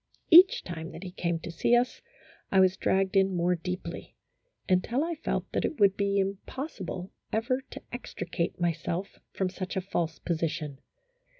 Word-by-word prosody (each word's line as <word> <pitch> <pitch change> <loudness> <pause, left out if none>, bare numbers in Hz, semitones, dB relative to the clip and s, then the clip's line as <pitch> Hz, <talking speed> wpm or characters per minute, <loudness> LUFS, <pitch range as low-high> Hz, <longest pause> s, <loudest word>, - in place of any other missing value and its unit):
Each 360 +3 +9
time 165 -2 -6
that 175 - -8
he 185 - -6
came 170 -1 -1
to 170 - -6
see 200 +8 +3
us, 250 - +1 0.5
I 195 - +5
was 185 0 +5
dragged 190 0 +1
in 195 -1 +4
more 175 +1 +2
deeply, 180 +2 -5 0.5
until 205 +9 +2
I 340 +1 -1
felt 320 - -3
that - - 0
it 305 - -2
would 200 -2 +5
be 200 0 +1
impossible 195 - -3 0.2
ever 255 +4 0
to - - -9
extricate 180 -9 -4
myself 170 +2 -2
from 190 -1 -1
such 185 0 -5
a - - +2
false 170 -5 -2
position. 155 -4 -2
185 Hz, 165 wpm, -29 LUFS, 170-200 Hz, 0.5 s, Each